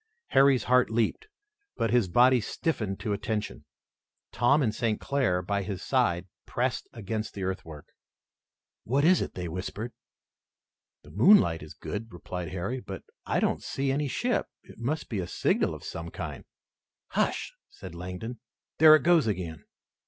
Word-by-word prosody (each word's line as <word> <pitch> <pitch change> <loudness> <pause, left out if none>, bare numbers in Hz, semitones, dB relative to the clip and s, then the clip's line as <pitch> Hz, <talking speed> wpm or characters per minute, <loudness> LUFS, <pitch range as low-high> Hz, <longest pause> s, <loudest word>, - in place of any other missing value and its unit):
Harry's 135 -1 +5
heart 125 0 +4
leaped, 115 - 0 0.5
but 115 - 0
his 120 -5 +3
body 125 +6 +5
stiffened 105 - -2
to 105 -3 -2
attention. 105 +1 -3 0.7
Tom 135 +6 +3
and 110 -4 +1
St. 110 -1 0
Clair 125 -11 0
by 100 +2 -1
his 95 -1 -5
side 105 -10 +1 0.2
pressed - - -1
against 110 0 -4
the 100 - -4
earthwork. 80 -6 -5 1.0
"What 135 +5 +1
is 180 +2 +5
it?" - - -4
they 90 -1 -4
whispered. 95 +7 -5 1.1
"The - - -14
moonlight 110 - +5
is 75 0 -10
good," 115 +2 -6
replied 90 0 -6
Harry, 95 +10 -3
"but 95 -5 -8 0.2
I - - +1
don't - - 0
see 135 0 -1
any 145 +2 0
ship. 245 - 0 0.2
It - - -15
must 140 +7 -2
be 105 - -3
a 90 - -3
signal 195 - +1
of - - -11
some - - -6
kind." - - -6 0.6
"Hush!" - - -1 0.2
said 95 -4 -10
Langdon, 90 +7 -6 0.4
"there 155 0 +10
it 155 - +1
goes 170 -6 +4
again!" 90 -6 -3
110 Hz, 155 wpm, -28 LUFS, 95-135 Hz, 1.1 s, there